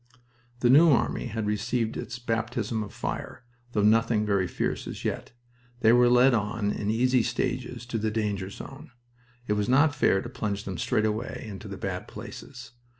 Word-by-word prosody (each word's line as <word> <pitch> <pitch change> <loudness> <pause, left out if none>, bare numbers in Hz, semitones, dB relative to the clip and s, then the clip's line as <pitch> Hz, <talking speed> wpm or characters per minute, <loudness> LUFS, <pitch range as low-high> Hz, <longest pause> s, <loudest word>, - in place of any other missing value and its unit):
The 120 - +4
New 160 +5 +7
Army 130 -2 +1
had 110 -1 -3
received 110 +2 -1
its 120 - -5
baptism 115 -1 -2
of 105 - -6
fire, - - -5 0.3
though 105 - +2
nothing 110 0 +3
very 100 -3 +1
fierce - - -2
as - - -7
yet. - - -3 0.5
They 110 +1 +6
were 120 0 +6
led 125 +2 +6
on 105 -1 0
in 105 - -3
easy 125 +3 +3
stages 120 +1 -2
to 120 -2 -3
the 110 +1 0
danger 105 -3 -2
zone. 135 +7 -10 0.6
It 105 - 0
was 105 +1 -1
not 145 +4 +4
fair 130 -7 +3
to 120 - -6
plunge 105 -4 -3
them 95 -3 -5
straight 110 - +1
away 110 +3 -3
into 100 -4 -8
the - - -7
bad - - -4
places. 125 -3 -10
115 Hz, 180 wpm, -27 LUFS, 105-125 Hz, 0.6 s, New